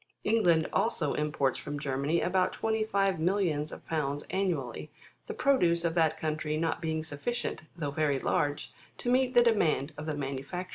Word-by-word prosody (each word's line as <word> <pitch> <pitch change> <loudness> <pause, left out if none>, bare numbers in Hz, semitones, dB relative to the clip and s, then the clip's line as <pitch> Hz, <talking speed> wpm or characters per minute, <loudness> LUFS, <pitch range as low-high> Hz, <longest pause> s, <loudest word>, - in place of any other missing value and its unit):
England 175 -8 +3
also 165 -10 +1
imports 150 -3 0
from 145 0 -5
Germany 140 +4 0
about 185 0 +1
twenty^ 220 -1 0
five 195 -3 +1
millions 165 -4 0
of - - -10
pounds 145 -3 -2
annually, 155 - -2 0.4
the - - -4
produce 175 -11 +3
of 165 - +1
that 160 -2 +2
country 155 -1 -2
not 165 +1 -1
being 160 -1 -1
sufficient, 160 +11 -3 0.2
though 145 -4 -2
very 145 -1 +1
large, 145 +2 -1 0.2
to 245 - -1
meet 255 0 +2
the 240 - +8
de 235 -1 +5
mand 155 -6 +1
of 155 - -6
the 155 - -1
manufacturers. 140 +6 -4
160 Hz, 175 wpm, -30 LUFS, 145-190 Hz, 0.4 s, the